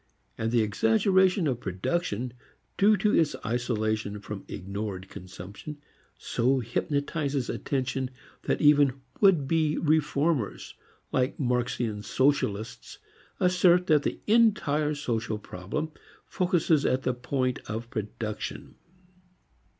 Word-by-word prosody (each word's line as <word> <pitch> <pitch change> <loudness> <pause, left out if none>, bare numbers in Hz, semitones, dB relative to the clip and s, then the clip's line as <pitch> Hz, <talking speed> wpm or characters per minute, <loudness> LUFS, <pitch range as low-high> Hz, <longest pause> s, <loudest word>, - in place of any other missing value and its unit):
And 110 +1 -2
the 120 -2 +3
exaggeration 180 - +3
of 130 -5 0
production 115 - -2 0.4
due 210 +2 +5
to 210 +1 +2
its 160 -3 +2
isolation 110 -3 -1
from 100 -1 -7
ignored 100 0 -5
consumption 95 +11 -9 0.4
so 130 +3 +1
hypnotizes 140 +2 -1
attention 130 -1 -2 0.4
that - - 0
even 145 -3 +5 0.2
would 180 -9 +4
be 155 0 +1
reformers, 150 -4 0 0.4
like 130 +1 0
Marxian 120 -4 -1
socialists, 110 -4 -1 0.4
assert 180 -1 +4
that 155 -4 +4
the - - -3
entire 180 -10 +3
social 115 -6 -2
problem 105 - -5 0.3
focuses 175 -5 +1
at 130 +1 +1
the 130 - +1
point 125 0 -1
of 115 +2 -4
production. 110 0 -5
130 Hz, 105 wpm, -27 LUFS, 110-155 Hz, 0.4 s, due